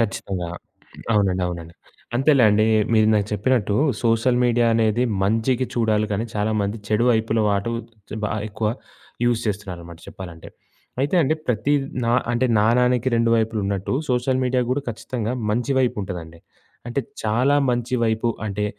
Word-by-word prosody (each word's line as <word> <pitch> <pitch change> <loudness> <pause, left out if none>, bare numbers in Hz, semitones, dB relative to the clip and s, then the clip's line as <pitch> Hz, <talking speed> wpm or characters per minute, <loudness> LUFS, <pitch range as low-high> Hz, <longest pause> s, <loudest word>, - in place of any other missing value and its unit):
ఖచ్చితంగా 95 -5 -2 0.6
అవునండి. 95 -3 +2
అవునండి. 85 -1 -6 0.4
అంతేలేండి 120 -6 +4 0.3
మీరిందాక 110 -2 +4
చెప్పినట్టు 105 -1 +1 0.3
సోషల్ 115 +2 +2
మీడియా 120 -1 +3
అనేది 115 +1 +2 0.2
మంచికి 115 +5 +1
చూడాలి 110 -2 +1
కానీ, 110 +3 -1
చాలామంది 105 0 0
చెడు 110 +2 +2
వైపుల 110 -1 +1
వాటు 100 +2 0 0.5
బాగా 110 - -1
ఎక్కువ 110 +1 -2 0.6
యూజ్ 120 -1 +2
చేస్తున్నారన్నమాట 90 -5 -5
చెప్పాలంటే. 85 -3 -9 0.5
అయితే 140 +6 0
అండి 150 +2 +2
ప్రతి 125 +4 0 0.3
నా 115 - +1 0.2
అంటే 120 +2 +2
నానానికి 125 +3 +3
2 115 0 +2
వైపులున్నట్టు 105 -4 -1 0.2
సోషల్ 130 +1 +1
మీడియా 125 0 +1
గూడా 140 +3 0
ఖచ్చితంగా 115 0 -4 0.2
మంచి 120 +5 0
వైపుంటదండి. 90 -9 -2 0.5
అంటే 120 +4 -1 0.2
చాలా 120 +6 +2
మంచి 120 +1 -1
వైపు 110 +1 0 0.2
అంటే 105 0 -2
110 Hz, 130 wpm, -22 LUFS, 105-120 Hz, 0.6 s, అంతేలేండి